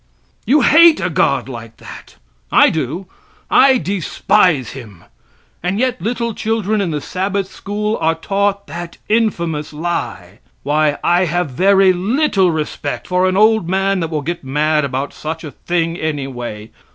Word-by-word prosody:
You 295 Hz, +3 st, +4 dB
hate 325 Hz, +5 st, +6 dB
a 185 Hz, -, -2 dB
God 155 Hz, -6 st, +1 dB
like 115 Hz, -3 st, -9 dB
that. -, -, -12 dB, 0.4 s
I -, -, +5 dB
do; 160 Hz, +5 st, -3 dB, 0.5 s
I 265 Hz, -1 st, +6 dB
despise 180 Hz, -, +1 dB
him. 105 Hz, -10 st, -11 dB, 0.6 s
And 180 Hz, +3 st, -1 dB
yet 250 Hz, -5 st, -1 dB
little 235 Hz, +3 st, -2 dB
children 215 Hz, -1 st, -1 dB
in 190 Hz, -, -1 dB
the 150 Hz, -2 st, -2 dB
Sabbath 190 Hz, +5 st, -2 dB
school 210 Hz, +3 st, -3 dB
are 165 Hz, +1 st, +2 dB
taught 200 Hz, +3 st, -1 dB
that 175 Hz, 0 st, -8 dB
infamous 170 Hz, -10 st, 0 dB
lie. 170 Hz, +3 st, -4 dB, 0.2 s
Why, 150 Hz, +1 st, +1 dB
I 175 Hz, +2 st, +3 dB
have 175 Hz, -2 st, -1 dB
very 190 Hz, +6 st, +4 dB
little 195 Hz, -, +1 dB
respect 155 Hz, -2 st, -4 dB
for 180 Hz, +1 st, +2 dB
an 185 Hz, -, -1 dB
old 215 Hz, -4 st, +3 dB
man 195 Hz, +1 st, +1 dB
that 165 Hz, -2 st, -2 dB
will 155 Hz, -3 st, -3 dB
get 170 Hz, +2 st, -4 dB
mad 150 Hz, +2 st, +1 dB
about 135 Hz, +1 st, -3 dB
such 160 Hz, +1 st, -6 dB
a 150 Hz, -, -7 dB
thing, 165 Hz, +3 st, -2 dB
anyway. 125 Hz, -9 st, -5 dB
175 Hz, 150 wpm, -17 LUFS, 150-200 Hz, 0.6 s, hate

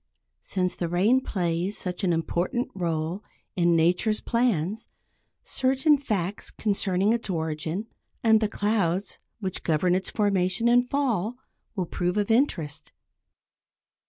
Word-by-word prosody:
Since 180 Hz, -2 st, -1 dB
the 175 Hz, -, -3 dB
rain 205 Hz, +10 st, +3 dB
plays 180 Hz, -2 st, -1 dB
such 180 Hz, +2 st, -3 dB
an 185 Hz, -, +2 dB
important 175 Hz, +8 st, -1 dB
role 170 Hz, +1 st, -2 dB, 0.3 s
in 175 Hz, -2 st, +3 dB
nature's 180 Hz, +6 st, +2 dB
plans, 225 Hz, -4 st, 0 dB, 0.6 s
certain 270 Hz, +3 st, +3 dB
facts 210 Hz, -9 st, -3 dB
concerning 200 Hz, -1 st, +1 dB
its 235 Hz, -3 st, -2 dB
origin, 160 Hz, +3 st, -2 dB, 0.4 s
and 220 Hz, -1 st, +5 dB
the 215 Hz, -, +1 dB
clouds 200 Hz, -3 st, 0 dB, 0.2 s
which 190 Hz, -2 st, -2 dB
govern 165 Hz, +2 st, +2 dB
its 185 Hz, +1 st, -1 dB
formation 200 Hz, 0 st, +1 dB
and 245 Hz, +1 st, +4 dB
fall, 245 Hz, -5 st, 0 dB, 0.4 s
will 185 Hz, -3 st, -1 dB
prove 180 Hz, +3 st, -2 dB
of 210 Hz, +1 st, +1 dB
interest. 190 Hz, -, 0 dB
195 Hz, 125 wpm, -26 LUFS, 175-225 Hz, 0.6 s, and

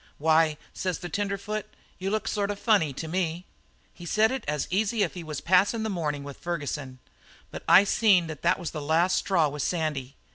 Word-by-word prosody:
"'Why,' 155 Hz, 0 st, +3 dB, 0.2 s
says 185 Hz, -2 st, -2 dB
the 175 Hz, -, -7 dB
tenderfoot, 205 Hz, +1 st, -3 dB, 0.3 s
'you 190 Hz, +1 st, -2 dB
look 215 Hz, +1 st, -1 dB
sort 205 Hz, -2 st, -1 dB
of 205 Hz, -, -3 dB
funny 200 Hz, -, +2 dB
to 150 Hz, +4 st, -6 dB
me.' 175 Hz, 0 st, -2 dB, 0.5 s
"He 175 Hz, -, -13 dB
said 215 Hz, +7 st, +2 dB
it 265 Hz, -3 st, -3 dB
as 150 Hz, -1 st, -1 dB
easy 210 Hz, +3 st, +1 dB
as 175 Hz, -, -1 dB
if -, -, -21 dB
he 175 Hz, -, -7 dB
was 155 Hz, -3 st, -5 dB
passin' 195 Hz, +5 st, +3 dB
the 220 Hz, -, -2 dB
morning 150 Hz, -6 st, -2 dB
with 140 Hz, -1 st, -9 dB
Ferguson, 145 Hz, -6 st, -4 dB, 0.5 s
but -, -, -7 dB
I 195 Hz, -, +8 dB
seen 200 Hz, -3 st, +4 dB
that 160 Hz, -3 st, -8 dB
it 175 Hz, -, +3 dB
was 175 Hz, -3 st, -5 dB
the 155 Hz, -, -5 dB
last 165 Hz, +5 st, +2 dB
straw 170 Hz, -6 st, +2 dB
with 145 Hz, 0 st, -5 dB
Sandy. 150 Hz, -5 st, -2 dB
175 Hz, 210 wpm, -27 LUFS, 155-200 Hz, 0.5 s, I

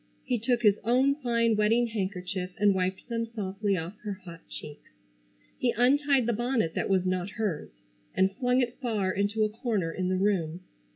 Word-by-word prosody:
He 245 Hz, -2 st, 0 dB
took 240 Hz, +2 st, +1 dB
his 205 Hz, -2 st, +5 dB
own 255 Hz, +5 st, +4 dB
fine 235 Hz, -5 st, +1 dB
wedding 220 Hz, +3 st, +3 dB
handkerchief 190 Hz, -4 st, -3 dB
and 205 Hz, -1 st, +4 dB
wiped 190 Hz, +2 st, -2 dB
them 230 Hz, -1 st, -2 dB
softly 200 Hz, -1 st, -1 dB
off 175 Hz, +5 st, -6 dB
her 210 Hz, -2 st, -4 dB
hot 165 Hz, -2 st, -10 dB
cheeks. 145 Hz, -1 st, -9 dB, 0.7 s
He 240 Hz, -2 st, +2 dB
untied 275 Hz, +1 st, +4 dB
the 235 Hz, -, +1 dB
bonnet 235 Hz, -6 st, 0 dB
that -, -, -1 dB
was 190 Hz, -2 st, +2 dB
not 185 Hz, 0 st, -1 dB
hers, 205 Hz, -6 st, -3 dB, 0.5 s
and 190 Hz, +1 st, +3 dB
flung 250 Hz, 0 st, +2 dB
it 245 Hz, -1 st, -3 dB
far 215 Hz, -7 st, 0 dB
into 205 Hz, +3 st, 0 dB
a 215 Hz, -, +2 dB
corner 210 Hz, -6 st, -1 dB
in 185 Hz, +1 st, -2 dB
the 185 Hz, -, +1 dB
room. 185 Hz, -4 st, 0 dB
210 Hz, 180 wpm, -28 LUFS, 185-240 Hz, 0.7 s, his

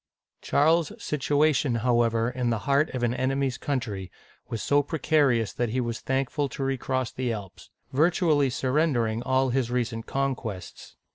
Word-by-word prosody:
Charles's 160 Hz, +2 st, +2 dB
situation, 145 Hz, -2 st, +1 dB
however, 115 Hz, -2 st, +2 dB
in 125 Hz, -1 st, -1 dB
the 115 Hz, -, +1 dB
heart 140 Hz, +2 st, +3 dB
of 125 Hz, -, -2 dB
an 120 Hz, 0 st, +2 dB
enemy's 130 Hz, 0 st, -1 dB
country, 105 Hz, -10 st, -3 dB, 0.4 s
was 115 Hz, -, -4 dB
so 145 Hz, 0 st, +3 dB
precarious 145 Hz, -7 st, +1 dB
that 120 Hz, -2 st, -1 dB
he 125 Hz, +4 st, -1 dB
was 120 Hz, -2 st, -2 dB
thankful 135 Hz, +2 st, -1 dB
to 135 Hz, -, -5 dB
re 135 Hz, 0 st, 0 dB
cross 130 Hz, -2 st, -1 dB
the 125 Hz, -2 st, -2 dB
Alps, 100 Hz, -4 st, -8 dB, 0.2 s
virtually 155 Hz, -1 st, +3 dB
surrendering 130 Hz, -4 st, 0 dB
all 130 Hz, 0 st, +1 dB
his 125 Hz, -2 st, 0 dB
recent 120 Hz, -2 st, -2 dB
con 135 Hz, 0 st, 0 dB
quests. 105 Hz, -7 st, -8 dB
130 Hz, 155 wpm, -26 LUFS, 115-140 Hz, 0.4 s, heart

